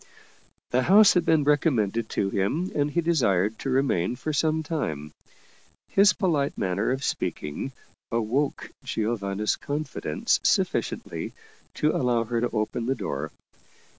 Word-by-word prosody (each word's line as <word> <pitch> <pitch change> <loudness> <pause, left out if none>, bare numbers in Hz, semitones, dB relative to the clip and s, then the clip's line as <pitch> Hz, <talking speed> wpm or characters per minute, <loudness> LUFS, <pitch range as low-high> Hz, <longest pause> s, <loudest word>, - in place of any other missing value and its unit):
The 125 - +3
house 200 +8 +7
had 175 -2 +2
been 160 -2 +3
recommended 120 - +1
to 95 - -1
him 140 - -1
and 145 0 +1
he 170 +4 0
desired 110 - +1
to 135 - -3
remain 125 -6 +1
for 155 +5 -4
some 155 +1 +1
time. 80 - -3 0.8
His 200 0 +5
polite 155 -7 0
manner 95 +2 0
of 130 +2 -1
speaking 75 - -3 0.4
awoke 120 +5 -1
Giovanna's 105 -2 -1
confidence 145 - -1
sufficiently - - -1 0.4
to 150 +1 +1
allow 120 -3 +1
her 115 0 -2
to 120 - +1
open 115 +1 -2
the 135 - +1
door. 70 - -4
125 Hz, 135 wpm, -26 LUFS, 105-150 Hz, 0.8 s, house